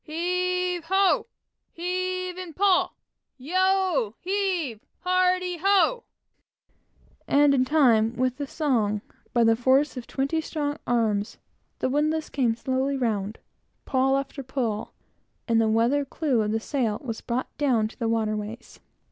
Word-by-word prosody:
"Heave 360 +1 -1
ho! 385 0 +3 0.5
Heave 365 +1 -2
and 360 -4 -8
pawl! 390 -2 +2 0.4
Yo, 370 - +1
heave, 365 - -1 0.2
hearty, 365 -1 +1
ho!" 400 +6 +2 1.2
and, 285 0 +4
in 255 -2 +3
time 240 -6 +3
with 255 0 0
the 285 - -4
song, 230 -10 0 0.3
by 240 -1 +3
the 225 0 +5
force 265 +4 +2
of 240 - -7
twenty 280 +4 -1
strong 295 -2 -3
arms, 220 -3 0 0.4
the - - -1
windlass 305 +3 0
came 245 -5 +1
slowly 260 +3 -1
round, 215 -4 -1 0.5
pawl 270 0 +2
after 275 +1 -4
pawl, 245 -5 -3 0.6
and 230 -1 +3
the 220 - +2
weather 235 +6 +2
clew 275 -3 0
of 210 0 -1
the 220 - 0
sail 225 -4 -1
was 230 -4 -5
brought 245 +2 -3
down 245 -7 +2
to 220 - -15
the 230 -2 0
waterways. 215 0 -3
275 Hz, 135 wpm, -25 LUFS, 230-355 Hz, 1.2 s, the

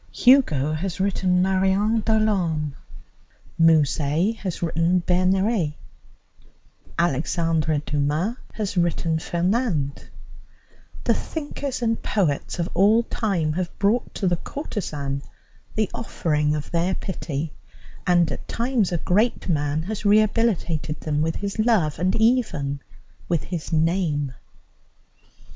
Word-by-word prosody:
Hugo 160 - +4
has 180 +4 -3
written 185 -2 +2
Marion 190 +4 +2
Delorme, 185 -10 +1 0.9
Musset 160 +4 +3
has 185 -5 -4
written 165 +2 +2
Bernerette, 185 -2 +2 1.2
Alexandre 165 0 +1
Dumas 150 +9 0 0.2
has 205 -2 -3
written 170 -2 +1
Fernande, 175 - -1 0.9
the - - +3
thinkers 285 -4 -4
and 225 -1 0
poets 175 -8 -1
of 170 -1 -1
all 210 +6 +4
time 185 -10 -1
have 175 +1 -3
brought 210 +5 +1
to 195 - -1
the 175 -1 +2
courtesan 150 - -4 0.5
the 215 -1 +1
offering 150 -9 0
of 150 - -5
their 175 +2 +1
pity, 160 -5 -4 0.5
and 175 -3 +4
at - - -7
times 235 -5 0
a 175 - +1
great 210 +8 +1
man 150 -1 0
has 210 +3 -5
rehabilitated 205 -8 +2
them 150 -1 -1
with 160 +1 0
his 200 +1 -4
love 210 -11 +2
and 185 +2 +1
even 215 - +1 0.5
with 170 -4 +1
his 175 -3 -5
name. 160 -4 +1
175 Hz, 115 wpm, -23 LUFS, 155-210 Hz, 1.2 s, Hugo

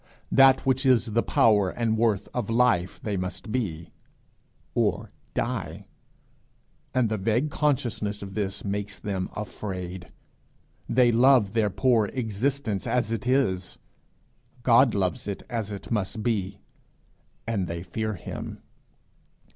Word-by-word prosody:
That 135 -1 +6
which 130 0 +2
is 130 -3 +4
the 115 - +3
power 105 -6 +3
and 115 +2 0
worth 110 -3 +1
of 120 -4 -2
life 115 -7 +2
they 105 -3 -2
must 90 +4 -5
be, 85 -10 -3 0.8
or - - 0 0.2
die; - - -3 1.1
and 125 -3 +2
the 110 -1 -2
vague 115 +9 +1
consciousness 120 -9 -1
of 95 -1 -8
this 100 -1 -3
makes 100 0 -3
them 95 -3 -3
afraid. 95 -4 -6 0.8
They 120 0 +4
love 120 -3 +5
their 110 -2 +2
poor 115 +1 +2
existence 115 -2 -1
as 125 -2 0
it 115 +2 -3
is; 120 -9 +1 0.9
God 120 0 +5
loves 95 -2 -1
it 100 - -4
as 110 -3 -2
it 100 +3 -8
must 105 0 -1
be 100 -4 -1 0.9
and 105 -5 -1
they 85 0 -5
fear 110 +4 -3
him. - - -7
110 Hz, 130 wpm, -26 LUFS, 100-120 Hz, 1.1 s, That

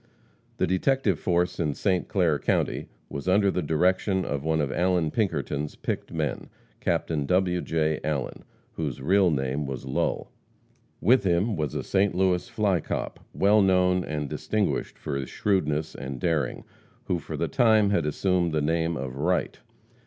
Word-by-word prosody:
The - - +2
detective 100 - +1
force 90 0 0
in 75 -4 0
St. 95 -3 0
Clair 85 -7 +1
county - - 0 0.2
was 70 +4 -6
under 100 +1 +4
the 90 - -1
direction 90 +4 +1
of 70 -1 -3
one 80 0 +1
of 70 -3 0
Allan 90 -2 +1
Pinkerton's 75 -9 -1
picked - - -4
men, 75 -6 -3 0.3
Captain 75 -4 -1
W. 90 0 +2
J. 80 -1 0
Allen, 75 -4 -3 0.3
whose 75 -5 -4
real 95 +7 +3
name 70 -1 -1
was 65 -1 -5
Lull. 65 - -1 0.7
With 125 +6 +4
him 95 +4 +1
was 75 -5 -2
a - - -2
St. 95 -1 +1
Louis 90 +2 +1
"fly 105 -6 +1
cop," - - -4
well 105 +2 +4
known, 90 -1 +3
and 75 -1 -3
distinguished 105 +8 -2
for 75 - -4
his 70 -2 -3
shrewdness 80 -6 0
and 65 -1 -6
daring, 75 -5 -1 0.4
who 90 - -1
for - - -6
the - - 0
time 110 -4 +4
had 100 -7 +1
assumed 90 +1 +1
the 80 - +2
name 80 +1 0
of 65 0 -5
Wright. 90 +5 0
85 Hz, 160 wpm, -26 LUFS, 75-95 Hz, 0.7 s, under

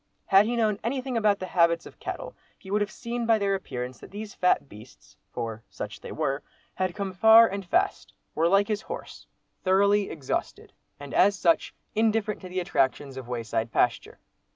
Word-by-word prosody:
Had 195 +2 +5
he 240 - -1
known 215 -3 +1
anything 255 +2 -2
about 210 -3 +3
the 185 - -5
habits 170 -1 +3
of - - -13
cattle, - - -6 0.2
he 190 - -12
would 210 +1 +2
have 205 - 0
seen 235 +1 -4
by 225 -1 +5
their 200 -1 0
appearance 125 -9 -5
that - - -12
these 210 +1 -7
fat 180 -5 +2
beasts 110 +1 -15 0.2
(for 115 -1 -5
such - - -7
they - - -8
were) 145 -3 -1 0.3
had 185 -2 -2
come 200 -2 -3
far 220 +4 +8
and 200 -1 -4
fast; 175 - 0 0.2
were 165 +2 +2
like 195 +3 +4
his 215 -1 -1
horse, 475 - -8 0.4
thoroughly 200 +2 +3
exhausted, 140 -5 -4 0.3
and 145 -1 -9
as 200 +1 +4
such, 170 -3 +2 0.2
indifferent 220 -1 +1
to 185 - -8
the 185 +1 -2
attractions 140 -6 0
of 130 -2 -8
wayside 115 -1 -2
pasture. - - 0
195 Hz, 185 wpm, -27 LUFS, 155-215 Hz, 0.4 s, far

